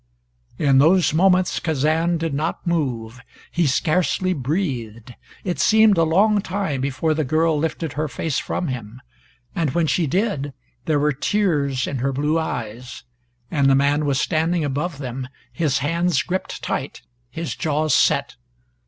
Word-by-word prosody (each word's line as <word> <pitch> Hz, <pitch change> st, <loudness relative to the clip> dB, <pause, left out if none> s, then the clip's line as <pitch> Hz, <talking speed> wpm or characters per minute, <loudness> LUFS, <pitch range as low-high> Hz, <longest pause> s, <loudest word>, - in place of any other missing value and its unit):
In 135 Hz, -2 st, +4 dB
those 165 Hz, +2 st, +4 dB
moments 185 Hz, +2 st, +3 dB
Kazan 160 Hz, +3 st, +1 dB
did 165 Hz, -2 st, -3 dB
not 155 Hz, +4 st, -2 dB
move. 125 Hz, -8 st, -2 dB, 0.3 s
He 170 Hz, -2 st, +1 dB
scarcely 180 Hz, +6 st, +1 dB
breathed. 125 Hz, -, -3 dB, 0.3 s
It 180 Hz, -2 st, -3 dB
seemed 220 Hz, -1 st, +5 dB
a 165 Hz, -, +3 dB
long 200 Hz, +6 st, +3 dB
time 185 Hz, -9 st, -2 dB
before 140 Hz, +4 st, 0 dB
the 155 Hz, 0 st, 0 dB
girl 155 Hz, +3 st, +2 dB
lifted 160 Hz, -1 st, -3 dB
her 155 Hz, +2 st, -2 dB
face 150 Hz, 0 st, -2 dB
from 175 Hz, -, -3 dB
him. 120 Hz, -2 st, -6 dB, 0.5 s
And 160 Hz, -4 st, -1 dB
when 170 Hz, -1 st, +2 dB
she 160 Hz, +1 st, +1 dB
did, 150 Hz, -5 st, -1 dB, 0.3 s
there 155 Hz, -2 st, +2 dB
were 150 Hz, +1 st, +2 dB
tears 145 Hz, -6 st, 0 dB
in 135 Hz, -, -3 dB
her 135 Hz, +3 st, 0 dB
blue 150 Hz, +4 st, 0 dB
eyes, 120 Hz, -5 st, -5 dB, 0.5 s
and 140 Hz, -4 st, +3 dB
the 135 Hz, -, +5 dB
man 145 Hz, +2 st, +2 dB
was 135 Hz, -2 st, +1 dB
standing 165 Hz, +1 st, 0 dB
above 145 Hz, +3 st, -2 dB
them, 130 Hz, -1 st, -5 dB, 0.3 s
his 150 Hz, -5 st, 0 dB
hands 170 Hz, -1 st, +1 dB
gripped 185 Hz, +1 st, -4 dB
tight, -, -, -4 dB, 0.3 s
his 165 Hz, +6 st, -5 dB
jaws 155 Hz, 0 st, 0 dB
set. 140 Hz, -2 st, +2 dB
155 Hz, 155 wpm, -22 LUFS, 135-170 Hz, 0.5 s, seemed